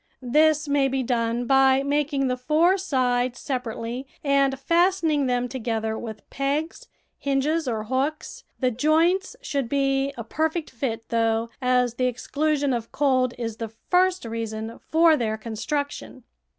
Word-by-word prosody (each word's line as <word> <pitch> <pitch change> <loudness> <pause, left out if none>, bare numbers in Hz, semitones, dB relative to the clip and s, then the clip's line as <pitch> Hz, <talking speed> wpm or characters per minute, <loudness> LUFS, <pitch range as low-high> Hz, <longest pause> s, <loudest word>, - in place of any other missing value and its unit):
This 310 0 +4
may 285 -1 +2
be 265 0 -1
done 235 0 0
by 270 +1 +4
making 285 -1 0
the 250 -1 0
four 310 +8 +3
sides 250 -7 0
separately 250 0 -4 0.2
and 275 -1 +2
fastening 335 -3 +2
them 245 0 0
together 225 -3 -2
with 220 -2 -8
pegs, 285 +4 -2 0.3
hinges, 285 +3 0
or 220 -3 -1
hooks; 265 +7 -3 0.2
the 255 -2 +1
joints 320 - +2
should 280 -5 -2
be 275 0 +1
a 235 - -4
per 315 +8 0
fect 320 -1 -5
fit, 230 -3 -4
though, 225 0 +1
as 250 -1 +2
the 255 +1 0
exclusion 285 +3 0
of 230 -2 -4
cold 255 -3 +1
is 230 -2 -4
the 225 -1 -4
first 360 - +1
reason 225 0 -5
for 325 0 +4
their 220 -5 -1
construction. 255 +4 -4
265 Hz, 145 wpm, -24 LUFS, 235-295 Hz, 0.3 s, This